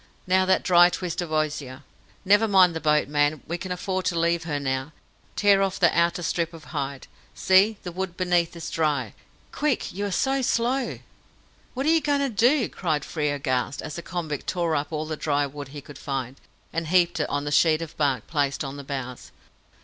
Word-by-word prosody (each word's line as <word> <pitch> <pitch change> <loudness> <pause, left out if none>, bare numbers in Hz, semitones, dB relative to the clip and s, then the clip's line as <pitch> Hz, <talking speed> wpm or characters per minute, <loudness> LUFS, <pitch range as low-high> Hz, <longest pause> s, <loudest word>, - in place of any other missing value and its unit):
Now 185 0 +3
that 190 - +3
dry 175 -1 +6
twist 180 -1 -3
of 170 -3 -5
osier! 150 -3 -2 0.4
Never 205 +3 +5
mind 185 -4 +5
the - - -2
boat, 150 -2 +2
man; 145 +1 +1
we 170 +2 -4
can 185 +1 -6
afford 185 +1 -2
to 170 - 0
leave 170 0 +1
her 150 -4 -2
now. 130 +2 -3 0.4
Tear 200 -1 +4
off 195 0 -1
that 175 - +4
outer 170 +1 +2
strip 170 0 -1
of 160 - -12
hide. 140 -3 -4 0.3
See, 195 +3 +4
the 180 - -5
wood 180 0 -5
beneath 175 -2 +1
is 170 - -6
dry! 155 -3 0 0.4
Quick 295 -4 -1
you 200 +3 -2
are - - -4
so 270 +8 +1
slow." 250 +2 0 0.8
"What 265 +2 -2
are - - +3
you 325 0 +4
going 290 -1 +1
to 275 - 0
do?" 240 +4 +3
cried 155 -5 -2
Frere, 150 -3 -1
aghast, 130 -1 -2
as 155 - -6
the 170 - -5
convict 165 -5 -5
tore 170 -3 0
up 145 +1 -2
all 155 0 -2
the 155 0 -4
dry 145 -1 0
wood 145 0 -8
he 145 +1 -9
could 145 0 -12
find, 135 -2 -4 0.4
and 165 -1 -2
heaped 175 0 +3
it 150 - -1
on 145 - -1
the 145 - -3
sheet 155 +2 +3
of 160 - -10
bark 140 -4 0
placed 145 -3 -1
on 135 0 -6
the 140 - -7
bows. 130 -3 -6
165 Hz, 210 wpm, -25 LUFS, 145-185 Hz, 0.8 s, dry